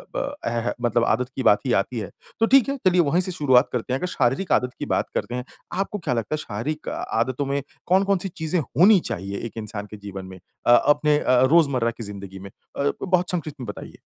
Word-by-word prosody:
ब 285 +1 -2
एह 120 0 -1
मतलब 120 -1 +2
आदत 125 +3 +1
की 130 - -2
बात 105 - +5
ही 125 - 0
आती 115 +4 0
है। 100 - -5 0.3
तो 225 - +5
ठीक 270 +1 +5
है 275 - -1
चलिए 180 -1 +5
वही 165 +4 +2
से 185 - -1
शुरुआत 135 -7 +3
करते 125 +1 -2
हैं। 135 - 0
अगर 180 - -2
शारीरिक 140 +4 0
आदत 125 0 +2
की - - -3
बात - - -1
करते 120 - -2
हैं, 125 0 -4 0.3
आपको 195 +2 -2
क्या 145 -7 -1
लगता 115 +4 -2
है - - -4
शारीरिक 150 +5 -4
आदतों 130 +4 -2
में 140 +1 -1 0.3
कौन 190 +2 +4
कौन-सी 195 -1 0
चीज़ें 160 +2 0
होनी 180 - +5
चाहिए 100 +2 -4
एक 115 - -8
इंसान 105 -1 -5
के 105 - -8
जीवन 100 -2 -8
में, 95 0 -10 0.3
अ, 120 - +5
अपने 150 +2 +3
अ - - -5
अ - - +4
रोजमर्रा 140 -8 +3
की 115 0 -9
जिंदगी 100 -2 -8
में? 100 +1 -9 0.3
अ, 140 - +1
बहुत 180 -1 +1
संक्षिप्त 155 -5 -4
में - - -5
बताइए? 105 - -8
130 Hz, 235 wpm, -23 LUFS, 115-175 Hz, 0.3 s, बात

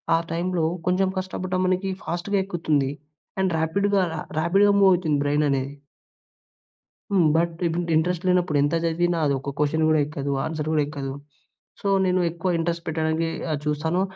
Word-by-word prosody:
ఆ - - +4
టైంలో 175 0 -1 0.2
కొంచెం 185 +1 +2
కష్టపడ్డా 185 0 -3
మనకి 185 +1 0
ఫాస్ట్‌గా 175 +4 -2
ఎక్కుతుంది. 155 -7 0 0.5
అండ్ 190 -1 +1
ర్యాపిడ్‌గా, 200 +5 +1
రా 160 - -4 0.2
ర్యాపిడ్‌గా 195 +5 +4
మూవ్ 195 -1 +6
అవుతుంది 160 -5 +1
బ్రెయిననేది. 145 -2 0 1.4
హ్మ్. 180 -5 +4
బట్ 170 +1 +2
ఇంట్ 170 +1 -2
ఇంట్రెస్ట్ 175 +3 0
లేనప్పుడు 180 -4 +2
ఎంత 145 +3 0
చదివిన, 175 +1 +1
అది 140 - +2
ఒక 140 +1 -5
క్వశ్చన్ 155 +2 +1
కూడా 155 -1 +4
ఎక్కదు. 140 -1 -4
ఆన్స‌ర్ 155 -1 -3
కూడా 150 -1 +3
ఎక్కదు. 140 -2 -5 0.7
సో, 200 - -1 0.2
నేను 185 0 +2
ఎక్కువ 170 +2 -3
ఇంట్రెస్ట్ 170 +1 -2
పెట్టడానికె 160 +1 0 0.2
ఆహ్, 150 - -1
చూస్తాను. 160 +4 0
165 Hz, 155 wpm, -24 LUFS, 150-185 Hz, 1.4 s, మూవ్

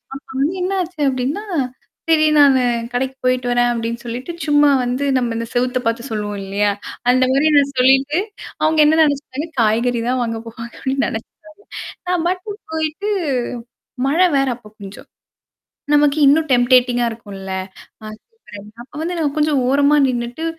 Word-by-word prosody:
அப்ப 275 - -11
வந்து 310 +7 0
என்ன 380 +2 -1
ஆச்சு 345 -2 -12
அப்படின்னா, 265 +9 -2 0.7
சரி 310 -1 +4
"நானு 270 -3 +5 0.3
கடைக்கு 265 +2 -2
போயிட்டு 255 -1 +1
வரேன்." 245 0 +2
அப்படின்னு 230 0 -3
சொல்லிட்டு 245 +7 -5 0.2
சும்மா 290 0 +5
வந்து 250 +3 -1
நம்ம 235 -2 -1
இந்த 230 0 -4
செவுத்த 250 +1 +1
பார்த்து 230 +3 -2
சொல்லுவோம் 205 -2 -3
இல்லையா? 205 +1 0 0.4
அந்த 255 +1 +3
மாரி 290 +3 +3
நான் 280 -1 +2
சொல்லிட்டு, 270 +5 +3 0.4
அவங்க 315 0 +2
என்ன 315 +1 +3
நெனச்சுட்டாங்க 285 +1 -2
காய்கறி 230 +2 +1
தான் 255 0 0
வாங்க 230 -1 -3
போவாங்க. 230 +1 -9
அப்டின்னு 270 0 -1
நினைச்சேன். 220 +1 -7 0.8
நான் 355 -2 0
மட்டும் 395 +3 -5
போயிட்டு 315 +6 -2 1.0
மழை 340 +6 +4
வேற 270 - +2
அப்ப 225 -4 -17
கொஞ்சம். 195 0 -11 0.9
நமக்கு 295 0 +3
இன்னும் 310 +2 +3
டெம்பேட்டிங்கா 245 0 +3
இருக்கும்ல. 200 -4 -8 0.5
அ - - -7 0.2
சூப்பர். 450 - -15 0.2
அப்ப 245 - -21
வந்து 350 +2 -2
நான் 300 -3 0
கொஞ்சம் 300 -2 +2
ஓரமா 285 +2 +3
நின்னுட்டு 240 +4 -3
260 Hz, 150 wpm, -19 LUFS, 240-300 Hz, 1.0 s, நானு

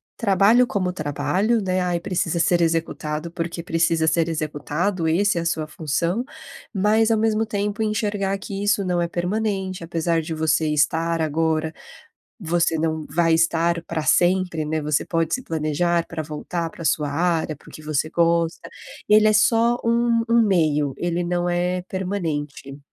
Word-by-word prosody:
trabalho 220 +3 +4
como 185 -5 -1
trabalho, 185 +8 0
né, 185 -2 -1
ai, 175 -1 0
precisa 170 -2 -1
ser 175 +1 +2
executado, 165 -1 -2
porque 170 0 -4
precisa 165 -1 +1
ser 165 +1 +2
executado, 160 +3 -2
esse 180 +3 +2
é - - -1
a - - -5
sua 160 -2 -1
função, 165 - -2 0.5
mas 215 +2 +2
ao 225 - +3
mesmo 220 0 +1
tempo, 205 0 -2
enxergar 205 -2 -1
que 195 0 -6
isso 205 -1 +1
não 180 -1 0
é 170 - 0
permanente, 190 +1 -2
apesar 165 0 0
de 160 +1 -5
você 160 0 +1
estar 160 +3 +1
agora, 160 0 0 0.7
você 170 -2 +1
não 160 -1 -1
vai 165 -1 +2
estar 165 +1 +1
pra 170 -2 -3
sempre, 175 -2 +2
né, 155 +1 -2
você 150 -1 0
pode 165 -1 0
se 255 - -7
planejar 165 +1 0
pra 160 -1 -5
voltar 165 +2 -4
pra 165 - -10
sua 150 -2 +1
área, 165 0 0
porque 155 +2 -14
você 155 0 -1
gosta. 170 0 +1 0.4
Ele 215 +1 +6
é 215 - +4
só 230 +2 +3
um 235 0 +2
um 230 0 +4
meio, 155 - +1
ele 175 0 -1
não 175 0 -1
é 180 +1 -1
permanente. 160 -8 -4
170 Hz, 160 wpm, -22 LUFS, 160-195 Hz, 0.7 s, Ele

